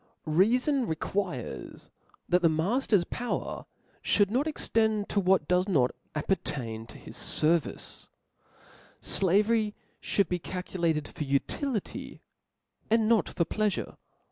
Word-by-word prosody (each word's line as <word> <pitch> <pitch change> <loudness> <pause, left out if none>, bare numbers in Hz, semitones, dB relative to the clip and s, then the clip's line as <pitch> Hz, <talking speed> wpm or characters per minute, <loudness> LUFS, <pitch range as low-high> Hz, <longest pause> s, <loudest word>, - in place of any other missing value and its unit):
Reafon 240 - +3
requires 160 - -4 0.4
that 180 +1 +3
the 165 - +5
matter's 195 +5 +2
power 240 +7 -4 0.5
(bould 205 -1 +4
not 265 +6 +1
extend 220 -8 0
to 205 - +1
what 185 -5 +3
does 180 +1 +2
not 135 -10 +3 0.2
appertain 120 - -2
to - - -11
his - - -3
fer 165 +2 +5
vice: - - -9 0.9
Slavery 210 +3 +2 0.3
fhould 200 - +1
be 180 - -1
calculated, 170 -4 -2
for - - -5
utility, 200 - -2 0.7
and 225 0 +3
not 225 -1 +3
for 170 - 0
pleafure. 210 +3 -1
190 Hz, 115 wpm, -29 LUFS, 160-220 Hz, 0.9 s, the